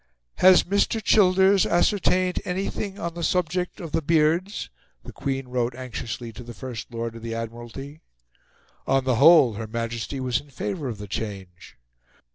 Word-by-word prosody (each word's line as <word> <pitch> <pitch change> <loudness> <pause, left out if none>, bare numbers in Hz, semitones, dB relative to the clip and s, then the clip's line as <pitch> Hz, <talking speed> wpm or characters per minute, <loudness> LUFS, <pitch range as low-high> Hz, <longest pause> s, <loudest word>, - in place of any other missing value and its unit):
"Has 185 0 +7
Mr. 200 +4 +1
Childers 190 -2 +4
ascertained 185 0 +2
anything 195 +2 -3
on 170 -2 -4
the 170 - -6
subject 180 +2 -1
of 170 -5 -7
the 165 - 0
beards?" 165 +5 +1 0.3
the - - -10
Queen 135 -1 -3
wrote 125 -1 -1
anxiously 120 -2 -6
to 105 - -10
the 120 -1 -10
First 125 -3 -7
Lord 115 0 -4
of 115 - -9
the 115 0 -4
Admiralty. 120 +6 -7 0.9
On 135 0 +2
the 130 -3 +1
whole, 140 -4 +7
Her 110 +1 -6
Majesty 115 +4 -4
was 130 0 0
in 145 - -20
favour 155 +2 -4
of 110 - -5
the 105 0 -8
change. 95 -4 -7
135 Hz, 160 wpm, -24 LUFS, 115-180 Hz, 0.9 s, Has